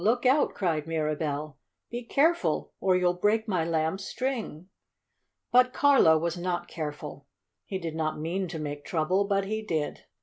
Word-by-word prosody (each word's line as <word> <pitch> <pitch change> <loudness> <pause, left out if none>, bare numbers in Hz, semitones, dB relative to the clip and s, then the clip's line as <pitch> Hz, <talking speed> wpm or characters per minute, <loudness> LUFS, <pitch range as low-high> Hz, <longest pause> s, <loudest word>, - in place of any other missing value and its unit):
Look 240 +5 +2
out!" 270 +4 +3
cried 160 -5 -1
Mirabell. 150 -2 -2 0.3
"Be 240 +1 -3
careful 320 +8 +1
or 185 -1 +3
you'll 180 -1 +3
break 210 +5 +1
my 185 -6 +1
Lamb's 160 +3 -1
string!" 225 - -4 0.8
But 250 0 +5
Carlo 275 - +5
was 170 +2 -1
not 175 0 -2
careful. 150 -3 -6 0.4
He 190 - -3
did 165 -4 -5
not 155 -1 -2
mean 180 +5 -2
to 165 - -6
make 145 -1 -5
trouble, 180 +4 +1
but 200 -1 +1
he 215 +2 -2
did. 160 -8 -3
175 Hz, 160 wpm, -28 LUFS, 155-215 Hz, 0.8 s, But